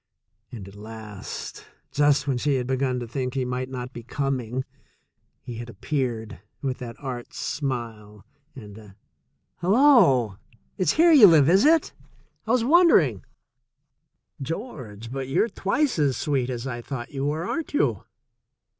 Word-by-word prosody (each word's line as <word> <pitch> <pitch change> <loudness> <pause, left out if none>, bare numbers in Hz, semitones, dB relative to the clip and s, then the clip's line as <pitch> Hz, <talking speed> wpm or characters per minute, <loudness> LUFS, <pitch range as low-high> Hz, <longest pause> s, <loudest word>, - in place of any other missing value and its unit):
And 105 -6 -8
at 100 - -12
last, 105 -1 -9 0.2
just 145 0 +3
when 130 -3 0
she 145 +2 +1
had 125 -2 -1
begun 130 0 -1
to 120 - -5
think 125 +2 -4
he 130 -2 0
might 125 +1 -3
not 125 -1 -6
be 120 - -7
coming, 130 0 -3 0.8
he 120 -2 -7
had 120 +1 -7
appeared 120 -1 -3 0.2
with 130 -2 -3
that 120 -2 -7
arch 125 -4 -6
smile 115 -7 -5 0.3
and 105 -6 -11
a 105 -3 -15 0.6
"Hello! 180 - +4 0.4
It's 185 - +1
here 335 +2 +5
you 270 -10 +9
live, 155 -5 +6
is 190 - +5
it? 320 0 +3 0.5
I - - 0
was 250 -2 +3
wondering. 245 - +4 1.2
George, 130 - -6
but 135 0 -4
you're 135 - +2
twice 200 - 0
as 140 -5 +2
sweet 135 -4 -1
as 120 -1 -4
I 120 -3 -4
thought 120 +2 -6
you 135 0 -2
were, 155 +3 -2
aren't 325 -3 -4
you - - +1
130 Hz, 150 wpm, -24 LUFS, 120-155 Hz, 1.2 s, you